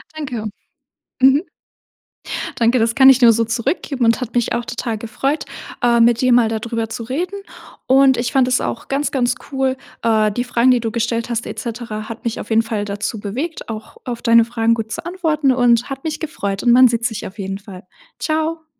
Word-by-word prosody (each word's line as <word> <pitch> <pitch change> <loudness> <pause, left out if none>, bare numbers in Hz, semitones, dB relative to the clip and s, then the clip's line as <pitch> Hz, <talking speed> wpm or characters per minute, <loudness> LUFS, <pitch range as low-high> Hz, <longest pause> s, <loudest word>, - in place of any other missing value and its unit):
Danke. 250 -8 -5 0.8
Mhm. 270 +5 +5 1.1
Danke, 235 +2 +2
das 230 +1 +1
kann 265 +1 +7
ich 260 - +7
dir 245 - +5
nur 230 - +7
so 230 +1 +1
zurückgeben 240 +2 -1
und 230 +3 +2
hat 245 0 -5
mich 240 - +1
auch 235 - -1
total 230 -1 -4
gefreut, 270 +7 -2 0.4
äh, 235 -1 +3
mit 235 +1 +4
dir 255 -1 +3
mal 240 -2 +5
da 220 -1 -2
drüber 230 0 -3
zu 225 - -6
reden 330 - -3 0.5
und 265 0 +5
ich 240 0 -1
fand 260 -2 +3
es 255 - +1
auch - - -4
ganz, 280 +2 0
ganz 250 -2 +1 0.2
cool, 265 -1 0 0.3
äh, 215 -2 +2
die 245 +4 -2
Fragen, 245 +1 +2
die 250 -2 +4
du 225 - -2
gestellt 230 +1 -2
hast 230 0 -2
et - - -7
cetera 225 -3 -5
hat 230 - -8
mich 235 0 -2
auf - - -8
jeden 225 +1 +4
Fall 220 -2 -3
dazu 205 +2 -4
bewegt, 255 +10 -5
auch 215 -1 -8
auf 240 -2 -5
deine 230 0 +5
Fragen 230 -1 +1
gut 225 -1 -5
zu - - -4
antworten 320 -6 0
und 245 -1 +3
hat 270 0 -6
mich 310 -1 -3
gefreut 200 -11 -4
und 240 - +3
man 255 +1 +7
sieht 235 0 -1
sich 220 -3 -3
auf 190 - -10
jeden 195 0 -4
Fall. 195 -3 -11 0.4
Tschau. 315 +1 -2
235 Hz, 215 wpm, -19 LUFS, 225-265 Hz, 1.1 s, kann